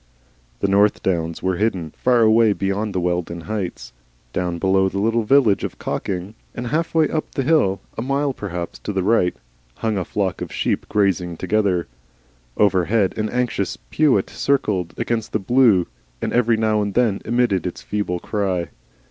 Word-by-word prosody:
The - - +2
North 100 +2 +3
Downs 85 -3 -1
were 95 -1 0
hidden, 95 -7 -1
far 125 -2 +3
away 110 -1 +5
beyond 100 +1 -2
the - - +2
Wealden 85 -1 -2
Heights. 100 - -5 0.4
Down 90 -2 -1
below 95 +2 +2
was 95 - -2
the - - -2
little 115 +3 +2
village 115 -3 +3
of - - -4
Cocking, 95 +2 -4 0.2
and 120 - -4
half 160 +7 -1
way 160 -1 +4
up 155 - -3
the 135 - 0
hill, 125 -10 +2
a - - -3
mile 140 +2 0
perhaps 90 -7 -5
to 105 - -4
the 95 -1 0
right, 95 -4 +2 0.4
hung 110 -3 -1
a - - -1
flock 95 -1 -2
of - - -5
sheep - - -1
grazing 90 -4 +1
together. 95 -2 +1 0.7
Overhead 100 0 +2
an 110 0 -1
anxious 120 -6 -1
peewit 140 -11 +2
circled 100 -11 0
against 115 -2 -2
the - - +3
blue, 110 -4 +4 0.3
and - - -3
every 120 -2 +3
now 110 -1 +2
and 100 -1 -3
then 115 -5 +2
emitted 115 -6 +1
its 90 - -7
feeble 100 -4 -2
cry. 95 -6 -2
100 Hz, 175 wpm, -21 LUFS, 95-115 Hz, 0.7 s, away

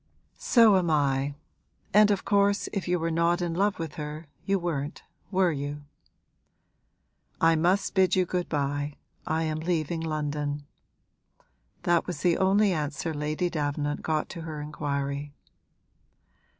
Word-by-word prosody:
'So 225 -5 +6
am 175 -2 +1
I! 140 -2 +1 0.6
And 210 +1 +7
of 200 -2 0
course 200 0 +2
if 195 -3 -2
you 180 0 +2
were 165 0 -1
not 170 +1 +2
in 175 -2 -1
love 195 +3 +1
with 165 0 -6
her 150 +2 -6 0.2
you 195 0 +3
weren't, 160 -4 -3 0.3
were 185 -3 +3
you?' 145 0 -4 1.6
'I 165 0 +4
must 180 +5 +2
bid 190 -1 +4
you 185 -1 +3
good 180 0 -2
bye, 145 0 -1 0.3
I 160 +1 0
am 155 -1 -1
leaving 165 -1 -1
London.' 150 -2 -2 1.2
That 175 -1 +2
was 180 - -4
the 175 -2 +2
only 195 +2 +4
answer 155 +1 -2
Lady 150 +4 -1
Davenant 145 -2 -2
got 155 -1 -1
to 170 - -7
her 160 -2 -6
inquiry. 145 -1 -3
160 Hz, 140 wpm, -27 LUFS, 145-180 Hz, 1.6 s, And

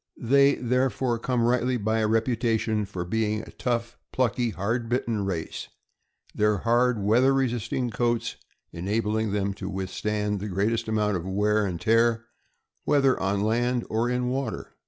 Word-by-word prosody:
They 140 +3 +4
there 125 +2 +1
fore 125 -3 -1
come 125 0 0
rightly 125 +1 +2
by 110 +1 0
a 110 - +2
reputation 115 -1 +1
for 95 -3 -5
being 110 +2 -1
a - - -11
tough, 120 -1 -3
plucky, 120 -1 +1
hard 115 +3 -2
bitten 115 -4 -1
race, 90 -4 -4 0.7
their 105 0 +2
hard, 120 +3 +2
weather 120 +6 +4
resisting 120 -1 -1
coats 120 +1 -1 0.4
en 85 +2 -6
abling 110 0 0
them 100 -1 -1
to 95 0 -6
withstand 105 +2 -2
the 105 - -4
greatest 110 +5 0
amount 105 -2 +1
of 85 - -6
wear 105 +2 +1
and 90 -3 -4
tear, 115 +1 +2 0.6
whether 135 -3 +3
on 100 +1 0
land 120 +2 0
or 115 +2 +1
in 125 0 0
water. 130 -2 -4
115 Hz, 155 wpm, -26 LUFS, 105-120 Hz, 0.7 s, They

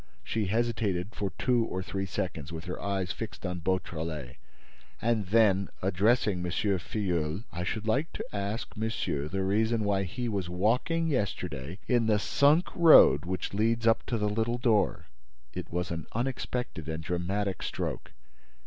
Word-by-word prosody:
She 110 -3 -1
hesitated 105 -3 0
for 100 - -2
two 125 -2 +2
or 95 -4 -3
three 95 +1 -3
seconds, 85 -4 -4
with 80 0 -6
her 90 - -5
eyes 95 -2 -1
fixed 110 -3 -6
on 90 -1 -3
Beautrelet, 80 -6 -3 0.6
and 110 -4 +1
then, 100 -2 +4
addressing 100 +1 +2
M. 90 - -2
Filleul: 90 -2 -1
"I 90 0 -4
should 105 +5 -3
like 135 +8 +2
you - - -4
to - - -10
ask 100 +5 -3
monsieur 95 -10 -2
the 95 +4 -2
reason 110 +3 +1
why 100 -1 +1
he 120 +7 -3
was 100 -5 -2
walking 120 - +1
yesterday 90 - -2
in 120 -3 +3
the 105 -1 +4
sunk 145 - +3
road 155 - +7
which 95 +2 -3
leads 115 +3 +1
up 115 0 +4
to 120 - 0
the 105 -1 0
little 115 +3 0
door." 110 -6 +2 0.5
It - - -6
was 90 0 -2
an 80 -2 -4
unexpected 125 - -3
and 80 0 -4
dramatic 95 +4 -2
stroke. - - -4
100 Hz, 160 wpm, -29 LUFS, 90-115 Hz, 0.6 s, road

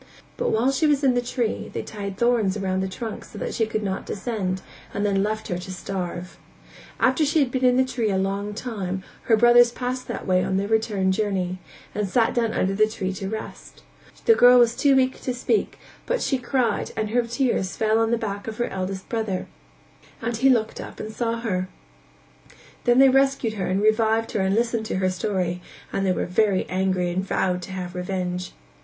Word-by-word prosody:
But - - -1
while 235 +5 +2
she 305 +4 +2
was 290 -1 +2
in 265 -2 +4
the 245 - +1
tree, 245 -2 -2
they - - -4
tied 200 -2 -6
thorns 225 -5 +2
round 190 -1 -1
the 190 - -1
trunk 215 +4 -6
so - - -12
that - - -4
she 225 - +1
could 215 -1 -2
not 190 -1 -2
descend 195 -4 -3 0.3
and 205 - 0
then 195 -1 +2
left 215 +2 -2
her 175 - -2
to 185 +1 -7
starve. 180 -1 -5 0.6
After 260 +4 +3
she 300 +2 +1
had 275 -5 +3
been 260 0 -1
in 250 0 +5
the 260 - +4
tree 245 -4 -1
a 195 - +1
long 200 +2 -2
time, 195 -5 -4 0.2
her 225 - +4
brothers 240 +1 +6
passed 255 +1 -4
that - - -5
way 185 -1 +2
on 190 0 0
their 200 +1 -1
return 210 -3 +1
journey, 190 -3 -1 0.3
and 205 -1 -2
sat 230 +2 +2
down 230 -2 +1
under 190 +1 0
the 215 +2 +3
tree 195 -3 -3
to 190 +1 -5
rest; 220 +1 -8 0.4
the 455 - +7
girl 250 - +7
was 235 -1 +5
too 280 -2 +4
weak 260 0 +1
to 255 - -2
speak 335 - 0 0.3
but - - +1
she 265 - 0
cried 245 -3 0
and 215 -1 -1
her 245 +1 +3
tears 235 -5 -1
fell 220 0 +2
on 225 0 +2
the 235 - +2
back 205 -2 -4
of 220 -1 -5
her 240 - -1
eldest 190 0 -4
brother, 220 -5 -2 0.7
and 230 0 -2
he 265 +4 +4
looked 225 -4 +1
up - - -10
and 215 0 -6
saw 230 0 -2
her; 185 -5 -2 1.2
then 240 -1 +4
they 270 +1 +8
rescued 270 -4 +2
her 195 -4 -3
and 190 +2 0
revived 220 +1 +2
her - - -1
and 190 +1 +1
listened 230 -1 0
to - - -2
her 185 0 +1
story; 180 -2 -2 0.3
and 195 0 0
they - - +3
were - - -1
very 195 +1 +2
angry 185 -1 0
and 185 +2 -1
vowed 180 -1 0
to 185 - -8
have 180 -2 -5
revenge. 180 0 -3
215 Hz, 210 wpm, -24 LUFS, 190-240 Hz, 1.2 s, they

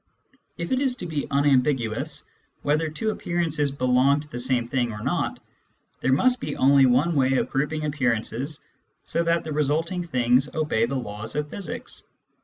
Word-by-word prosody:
If 170 -1 -4
it 260 - +2
is 265 -2 +1
to 245 - -7
be 155 -4 -3
unambiguous 135 -5 +1 0.4
whether 155 +2 +1
two 215 +8 -1
appearances 165 -7 -1
belong 130 +1 +3
to 150 - -13
the 120 -4 -6
same 125 -1 +1
thing 120 -1 -1
or 105 -1 -7
not, - - -1 0.6
there 130 - +1
must 245 - +3
be 150 - -3
only 135 0 +6
one 135 +8 +3
way 135 -3 +2
of 130 - 0
grouping 150 +3 -1
appearances 135 0 -1 0.4
so 170 - 0
that 170 0 +1
the 155 - -4
resulting 160 +5 0
things 130 -3 +2
obey 150 -8 +1
the 135 - -3
laws 110 -2 -4
of 150 0 -2
physics. 195 -6 -5
145 Hz, 170 wpm, -25 LUFS, 125-160 Hz, 0.6 s, only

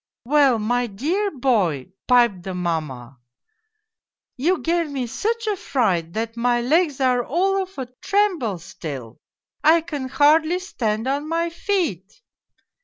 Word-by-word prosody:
" - - -70
' - - -70
Well, 275 -2 +4
my 240 +3 0
dear 320 - -1
boy,' 215 - 0 0.2
piped 240 -7 +4
the^ 185 0 -5
mamma, 145 -8 -4 0.6
' 425 - -53 0.5
you 340 +8 +1
gave 335 -1 0
me 270 -3 -3
such 455 - -2
a 425 -1 0
fright 180 - 0
that 225 +1 -3
my 240 +1 +1
legs 295 +3 +1
are 250 -2 +2
all 385 +9 +1
of 380 -2 -8
a 260 - -3 0.2
tremble 360 - +1
still, 145 -9 -8 0.4
I 325 +2 +6
can 295 -5 -5
hardly 310 +5 +4
stand 225 - -2
on 285 +3 -1
my 335 +1 0
feet 330 - -2
260 Hz, 150 wpm, -22 LUFS, 210-335 Hz, 0.6 s, I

